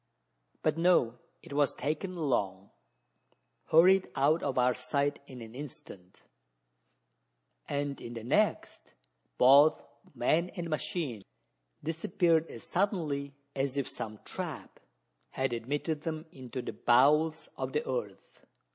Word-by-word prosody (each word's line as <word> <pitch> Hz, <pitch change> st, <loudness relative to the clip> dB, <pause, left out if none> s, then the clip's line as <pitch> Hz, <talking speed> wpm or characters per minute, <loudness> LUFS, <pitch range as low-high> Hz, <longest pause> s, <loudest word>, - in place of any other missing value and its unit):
But 155 Hz, +1 st, +1 dB
no: 130 Hz, -9 st, +3 dB, 0.2 s
it -, -, -10 dB
was 145 Hz, -1 st, +2 dB
taken 180 Hz, +5 st, -3 dB
along 100 Hz, -, -1 dB, 0.9 s
hurried 185 Hz, +4 st, +5 dB
out 150 Hz, +5 st, +3 dB
of 135 Hz, -3 st, -2 dB
our 125 Hz, 0 st, +4 dB
sight 140 Hz, +3 st, -1 dB
in 125 Hz, -3 st, -9 dB
an 110 Hz, 0 st, -11 dB
instant 120 Hz, -9 st, -10 dB, 1.5 s
and 140 Hz, -1 st, -2 dB
in 120 Hz, -, -7 dB
the 115 Hz, -, -6 dB
next, 205 Hz, -, 0 dB, 0.4 s
both 140 Hz, +4 st, +6 dB, 0.3 s
man 170 Hz, +3 st, +2 dB
and 170 Hz, -3 st, -4 dB
machine 145 Hz, -, -3 dB, 0.6 s
disappeared 165 Hz, +1 st, +1 dB
as 115 Hz, -, -9 dB
suddenly 155 Hz, -8 st, -1 dB, 0.2 s
as 135 Hz, 0 st, -1 dB
if 140 Hz, -, 0 dB
some 110 Hz, -1 st, -6 dB
trap -, -, -6 dB, 0.5 s
had 130 Hz, -2 st, -1 dB
admitted 145 Hz, +6 st, -2 dB
them 160 Hz, 0 st, -4 dB
into 130 Hz, -1 st, -7 dB
the -, -, -5 dB
bowels 150 Hz, +6 st, +3 dB
of 130 Hz, 0 st, -4 dB
the 150 Hz, -, 0 dB
earth! 105 Hz, -7 st, -5 dB
140 Hz, 120 wpm, -31 LUFS, 125-160 Hz, 1.5 s, both